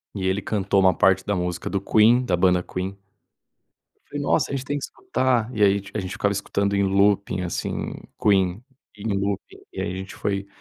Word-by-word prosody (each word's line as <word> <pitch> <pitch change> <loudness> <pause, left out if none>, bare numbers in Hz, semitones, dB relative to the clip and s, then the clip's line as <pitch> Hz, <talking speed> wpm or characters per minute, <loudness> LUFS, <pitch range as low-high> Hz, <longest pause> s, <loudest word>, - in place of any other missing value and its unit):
E 95 -1 -2
ele 95 +2 0
cantou 100 -2 0
uma 95 -1 +5
parte 95 0 +3
da 100 - 0
música 90 -1 -3
do 100 -1 -1
Queen, 115 +5 +4
da 90 -8 0
banda 90 0 +3
Queen. 95 +2 -5 1.1
Falei: 145 0 -4
"Nossa, - - +1
a 140 - -1
gente 130 - -5
tem 145 +1 -2
que - - -6
escutar." 130 - 0
E 105 - 0
aí 100 0 +4
a 105 - -1
gente 95 +1 -5
ficava 100 0 0
escutando 100 0 -1
em 100 - +2
looping 100 -1 +2
assim, 85 -2 -3 0.3
Queen 95 +1 +2 0.3
em 105 0 -2
looping 100 0 -3
e - - -5
aí 90 - -2
a 90 - -5
gente 95 +1 -7
foi 100 -1 -2
100 Hz, 205 wpm, -24 LUFS, 95-105 Hz, 1.1 s, uma